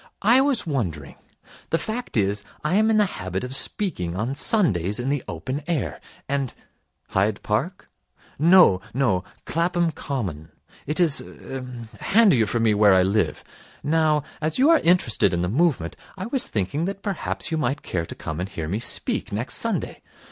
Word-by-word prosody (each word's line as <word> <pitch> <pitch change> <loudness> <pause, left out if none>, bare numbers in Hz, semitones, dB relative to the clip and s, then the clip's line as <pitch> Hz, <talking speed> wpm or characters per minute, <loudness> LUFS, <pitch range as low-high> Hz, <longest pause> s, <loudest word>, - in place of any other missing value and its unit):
I 235 +6 +6
was 270 -6 +2
wondering 90 - -3 0.6
the 165 - +2
fact 220 - -4
is, 100 0 0 0.2
I 150 +3 0
am 215 +3 +4
in 220 - +3
the 210 - +5
habit 95 - -4
of 125 +1 -5
speaking 90 - -2
on 110 +7 -2
Sundays 105 - +1
in 125 +2 -2
the 145 -1 -1
open 130 - -4
air, 130 - -2 0.3
and 140 -2 -2 0.3
' - - -48
'Hyde 100 +2 0
Park?' 135 - -2 0.5
'No. 165 - +6
No. 105 -9 +1 0.2
Clapham 170 0 0
Common. 100 - -5 0.4
It 150 +4 -2
is 165 -4 +5
er 130 -1 -8 0.3
handier 195 - +4
for 120 - 0
me 115 -2 +3
where 105 -2 +5
I 95 - +5
live. 95 -4 0 0.4
Now, 155 -1 +2 0.2
as 155 0 0
you 280 +5 +5
are 330 - +6
interested 120 - +3
in 85 - -1
the 90 - -1
movement, 130 - +1 0.2
I 185 - -4
was 250 +3 +3
thinking 110 - -2
that 195 +1 -5
perhaps 200 -3 -3
you 160 - 0
might 145 0 -1
care 85 -2 -3
to - - -8
come 80 0 -5
and 90 +2 -3
hear 80 -5 -5
me 100 +7 -2
speak 120 - 0
next - - -3
Sunday. - - -3
135 Hz, 175 wpm, -23 LUFS, -, 0.6 s, I